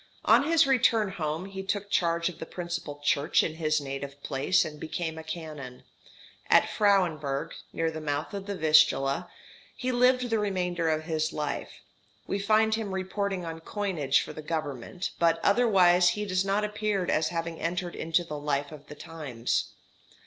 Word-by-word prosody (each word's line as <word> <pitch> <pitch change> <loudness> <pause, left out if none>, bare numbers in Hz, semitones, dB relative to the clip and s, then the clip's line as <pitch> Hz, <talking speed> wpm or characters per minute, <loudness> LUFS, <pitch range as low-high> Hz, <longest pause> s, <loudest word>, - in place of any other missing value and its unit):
On - - +5
his 330 -2 +5
return 230 -5 +3
home, 160 -1 -3
he 195 -1 -6
took 200 +1 -3
charge 170 -2 +2
of 180 - -6
the 160 - -6
principal 170 -4 -5
church 145 0 +3
in 155 - -2
his 155 -2 +1
native 140 0 -6
place, 145 +6 +2
and 150 -1 -8
became 160 +1 -4
a - - -8
canon. 155 -6 -7 0.7
At - - +6
Frauenburg, 170 -9 +1 0.2
near 165 0 -1
the 160 0 -6
mouth 145 +2 -3
of 200 0 -5
the 200 - -3
Vistula, 150 -4 +3 0.5
he 255 0 -1
lived 250 0 +3
the 225 - +2
remainder 180 -5 -1
of 155 0 0
his 155 -1 -1
life. 150 -1 -4 0.4
We 195 - -2
find 220 +2 +3
him 215 -3 -2
reporting 190 -1 -2
on 165 0 -6
coinage 165 -7 0
for - - -7
the 155 - -7
Government, 155 +2 -4
but 165 -1 +3
otherwise 185 -6 +5
he 210 +4 -2
does 185 -1 +1
not 195 +2 0
appear 210 -2 -1
as 155 -2 +1
having 165 -1 -4
entered 175 +1 -2
into 165 +2 0
the 150 -3 -6
life 145 0 -1
of 150 -1 -12
the 150 - -9
times. 145 -8 -3
170 Hz, 170 wpm, -28 LUFS, 155-195 Hz, 0.7 s, At